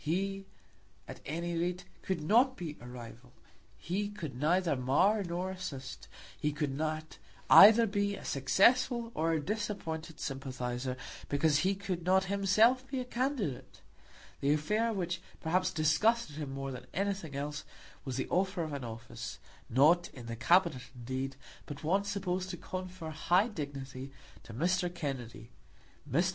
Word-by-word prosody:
He, 195 +4 -1 0.6
at - - -8
any 170 +3 -2
rate, 175 +2 -1 0.2
could 185 -5 -2
not 245 - +4
be 160 -4 -5
a 120 - -9
rival. 125 0 -10 0.4
He 200 +4 -2
could 165 -11 -6
neither 165 +4 +2
mar 145 +12 +3
nor 180 +1 -3
assist. 140 -8 -7 0.3
He 150 -1 +1
could 145 -2 -2
not 155 +1 -2
be - - -13 0.3
either 220 +4 +10
a 200 -2 -1
successful 235 - +3
or 165 +1 +1
a 160 - +2
disappointed 165 -4 -4
sympathiser, 130 -2 -3 0.3
because 145 +1 +3
he 190 +5 +2
could 185 -3 -4
not 190 +2 +4
himself 220 +7 +4
be 270 -1 -3
a 250 - -3
candidate. 245 - -2 0.6
The 140 +1 +3
affair 210 +10 +1
which 180 -4 -2 0.2
perhaps 180 +3 +1
disgusted 160 +5 +2
him 145 -3 -4
more 135 0 -4
than 125 -1 -8
anything 195 -6 -2
else 145 +1 -3 0.4
was 130 -3 -4
the 130 - -1
offer 185 -1 +1
of 155 -2 -5
an 140 -2 -4
office, 115 -1 -7 0.3
not 155 +8 +5
in 120 -3 -9
the 115 0 -5
Cabinet, 170 +2 +3
indeed, 130 +2 -4 0.3
but 145 0 -8
one 195 +6 +2
supposed 190 -2 -2
to 175 - -5
confer 185 -2 -6
high 175 +8 +2
dignity, 140 - -6 0.3
to - - -12
Mr. 175 +5 +1
Kennedy. 125 -9 -5 0.6
Mr. 170 +8 +2
165 Hz, 150 wpm, -32 LUFS, 140-195 Hz, 0.6 s, either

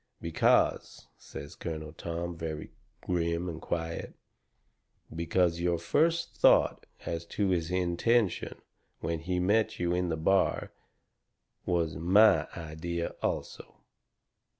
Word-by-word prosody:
"Because," 85 -1 +1
says 70 +1 -9
Colonel 80 -2 -6
Tom, 85 +1 -4
very 80 -2 -5 0.3
grim 85 0 -1
and 80 -2 -5
quiet, 80 -1 -4 1.0
"because 85 +1 +1
your 85 0 +1
first 165 - +1
thought - - +4 0.2
as 85 0 -3
to 100 +1 0
his 85 -3 0
intention 90 +4 +1 0.4
when 80 0 -2
he 90 +2 -2
met 105 +5 +2
you 85 0 +1
in 90 0 0
the 80 - -1
bar 95 +4 +1 1.0
was 85 -3 0
MY 95 +7 +5
idea 85 +1 -4
also. - - -4
85 Hz, 110 wpm, -30 LUFS, 80-90 Hz, 1.0 s, MY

